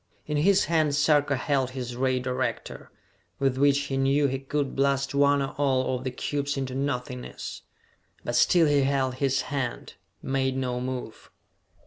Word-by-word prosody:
In 150 -1 -2
his 190 +6 +4
hand 155 -3 +1
Sarka 145 -1 +3
held 135 -1 0
his 125 -1 -4
ray 130 0 +1
director, 125 0 -3 0.5
with 135 -1 0
which 140 0 +4
he 140 -1 -3
knew 135 +2 +2
he 135 -1 0
could 140 0 -2
blast 135 0 +1
one 140 0 +3
or 135 - -4
all 130 -2 +1
of 125 - -5
the - - 0
cubes 140 +2 -3
into 130 -1 -3
nothingness. 125 -2 -4 0.6
But 120 - -3
still 165 +7 +5
he 145 -2 +3
held 135 -1 +1
his 135 0 0
hand, 130 -4 -3 0.3
made 130 -1 0
no 125 -2 -2
move. 125 -3 -6
135 Hz, 160 wpm, -26 LUFS, 130-145 Hz, 0.6 s, still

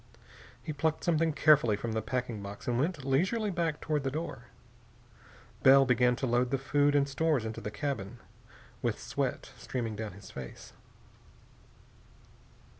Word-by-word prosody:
He 155 - -4
plucked 160 +2 -1
something 165 -1 +2
carefully 150 -8 +4
from 115 +3 -4
the 110 0 -1
packing 120 -2 -3
box 100 +1 -8
and 120 -1 +1
went 155 -1 -1
leisurely 190 - +1
back 165 -4 -1
toward 150 -3 -1
the 135 - 0
door. 135 -4 -5 1.2
Bell 135 +1 +7
began 125 -1 +3
to 130 - -2
load 120 0 +2
the 135 - +1
food 145 +2 +2
and 140 -1 +3
stores 140 -3 +1
into 110 0 -5
the - - -4
cabin, 120 -3 -4 0.6
with - - -1
sweat - - -3
streaming 115 -4 -3
down 105 -2 -5
his 100 +2 -12
face. 65 -2 -9
135 Hz, 150 wpm, -30 LUFS, 115-150 Hz, 1.2 s, Bell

